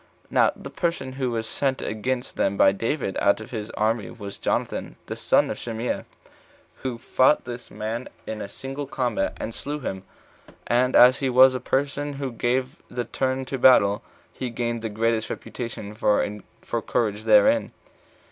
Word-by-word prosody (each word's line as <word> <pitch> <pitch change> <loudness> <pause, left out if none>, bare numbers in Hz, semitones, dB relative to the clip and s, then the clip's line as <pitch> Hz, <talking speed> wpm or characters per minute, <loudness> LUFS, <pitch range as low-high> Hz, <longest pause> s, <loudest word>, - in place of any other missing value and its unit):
Now - - +4
the - - -9
person 170 -7 -2
who 130 -1 -2
was 115 -1 -2
sent 135 +3 -1
against 125 +4 -3
them 100 0 +1
by 95 - +6
David 115 +1 -2
out 100 +1 +4
of 110 - -10
his 110 -3 -4
army 110 -2 +1
was 100 -4 -8
Jonathan, - - -2
the - - -5
son - - +2
of - - -5
Shimea, 115 +1 -3 0.7
who 130 -3 -4
fought 130 +4 +3
this 120 -1 -7
man 115 +3 -4 0.2
in 110 -1 -5
a - - -5
single 135 +1 -6
combat, 125 -7 -1
and 115 - -4
slew 145 +5 -4
him; 95 -6 -4 0.6
and 125 +2 +2
as 125 +2 +8
he 135 - 0
was 130 +1 +7
the 130 - -2
person 145 +3 -1
who 135 -2 -4
gave 125 +2 -1
the 120 -1 -3
turn 130 +2 -1
to 135 - -3
the - - -13
battle, 105 -5 +6 0.3
he 130 - -4
gained 120 0 -2
the 110 - -3
greatest 110 +1 0
reputation 115 -4 -6
for 105 -1 -1
courage 110 -2 -1
therein. 270 +2 +5
120 Hz, 170 wpm, -25 LUFS, 110-130 Hz, 0.7 s, as